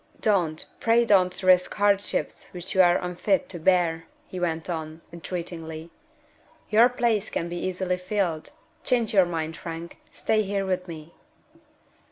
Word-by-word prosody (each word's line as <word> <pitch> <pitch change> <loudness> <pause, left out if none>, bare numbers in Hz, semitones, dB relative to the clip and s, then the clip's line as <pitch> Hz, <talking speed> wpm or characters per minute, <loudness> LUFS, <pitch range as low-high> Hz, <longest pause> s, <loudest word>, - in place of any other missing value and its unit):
"Don't, 175 -7 +1
pray 235 +1 +3
don't, 185 -4 +3
risk 180 -1 +4
hardships 205 -1 0
which 180 0 -7
you 190 - +5
are 175 -1 +5
unfit 180 +2 0
to 175 - -5
bear!" 165 -2 +2 0.2
he 185 - -7
went 165 -2 -2
on, 160 -2 -5
entreatingly. 165 -2 -6 0.8
"Your 230 +3 +6
place 235 -4 0
can 170 - -2
be 175 0 -5
easily 185 0 -1
filled. 180 -4 -2 0.3
Change 235 -3 +1
your 190 -3 +6
mind, 160 -1 -3
Frank. 165 0 -7
Stay 215 -1 +1
here 200 -1 -2
with 185 -1 -2
me." 160 -1 -9
180 Hz, 145 wpm, -25 LUFS, 165-200 Hz, 0.8 s, Your